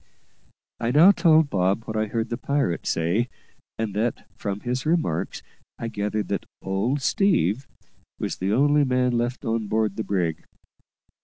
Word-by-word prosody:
I 115 - -1
now 155 +9 +7
told 160 -5 +4
Bob 95 +3 +1
what 110 - -5
I 110 0 +1
had - - -10
heard 115 0 -2
the 120 - -2
pirate 140 -12 -1
say, 90 +9 +1 0.5
and 110 -3 -2
that, 110 +3 -1
from 100 0 -4
his 125 +1 -2
remarks, 155 - -1 0.3
I 115 - -4
gathered 105 0 -2
that 100 - -2
"old 115 +9 -1
Steve" 135 - +2 0.5
was - - -3
the 95 +2 -1
only 145 +5 +4
man 125 -1 +2
left 120 +1 -2
on 115 -1 -1
board 110 -2 0
the 110 - -1
brig. 90 -6 -1
115 Hz, 160 wpm, -24 LUFS, 100-135 Hz, 0.5 s, now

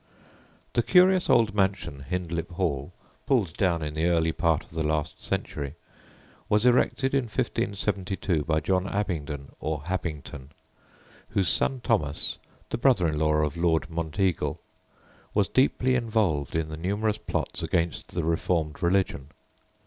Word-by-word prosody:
The 120 - +3
curious 185 +5 +5
old 115 -5 +4
mansion 90 -8 -1
Hindlip 85 -2 -3
Hall 85 -5 -1 0.4
(pulled 105 - +2
down 85 -5 +1
in 75 -1 -3
the 80 +2 +1
early 80 -2 +2
part 80 -1 +1
of - - -22
the 80 0 -3
last 75 -1 -1
century) 70 0 -3 0.7
was 105 +2 +3
erected 130 +2 +3
in 135 -2 +2
1572 100 - -1
by 80 +1 +1
John 95 +3 +1
Abingdon, 80 -9 -3
or 75 -2 -3
Habington, 75 -5 -5 0.8
whose 95 -4 +1
son 135 -2 +1
Thomas 80 - 0 0.3
(the - - -2
brother 120 -8 +4
in 75 -1 -2
law 75 0 +3
of 75 +1 -1
Lord 85 0 +1
Monteagle) 85 +2 -1 0.8
was 100 -3 +3
deeply 130 +2 +2
involved 105 - 0
in 80 -1 0
the 80 - -6
numerous 105 +5 -1
plots - - -3
against 85 -3 -1
the 85 - 0
reformed 80 -1 0
religion. 90 -6 +1
85 Hz, 140 wpm, -27 LUFS, 80-105 Hz, 0.8 s, curious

